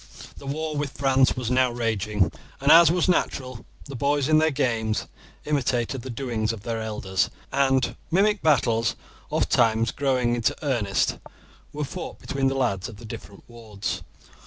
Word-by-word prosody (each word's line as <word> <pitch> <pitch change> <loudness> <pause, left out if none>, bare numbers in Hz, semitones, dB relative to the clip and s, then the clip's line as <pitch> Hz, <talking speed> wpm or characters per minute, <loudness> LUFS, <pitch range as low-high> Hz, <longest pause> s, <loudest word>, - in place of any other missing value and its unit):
The 140 - -10
war 155 +2 -3
with 145 -2 -3
France 135 -1 +3
was 125 -2 -2
now 130 0 +3
raging, 105 -5 0 0.3
and, 140 +2 +3
as 165 -1 +9
was 175 -1 +1
natural, 130 -9 -1 0.2
the 140 - -8
boys 140 +1 +1
in 155 0 +5
their 160 0 +3
games 115 -6 0 0.4
imitated 130 -3 0
the 130 - -8
doings 115 -3 -2
of 110 -3 -8
their 115 -1 -3
elders, 100 -4 -1 0.2
and 135 -1 +2
mimic 205 +3 +2
battles, 115 -7 +2 0.3
ofttimes 115 +1 +2
growing 130 -4 +1
into 120 -2 +1
earnest, 115 -9 0 0.5
were 150 0 -4
fought 180 +5 -7
between 135 -1 -1
the 135 - 0
lads 110 -7 -1
of 110 - -11
the 115 - -11
different 100 -2 -10
wards. 110 -4 -5
125 Hz, 160 wpm, -25 LUFS, 115-140 Hz, 0.5 s, as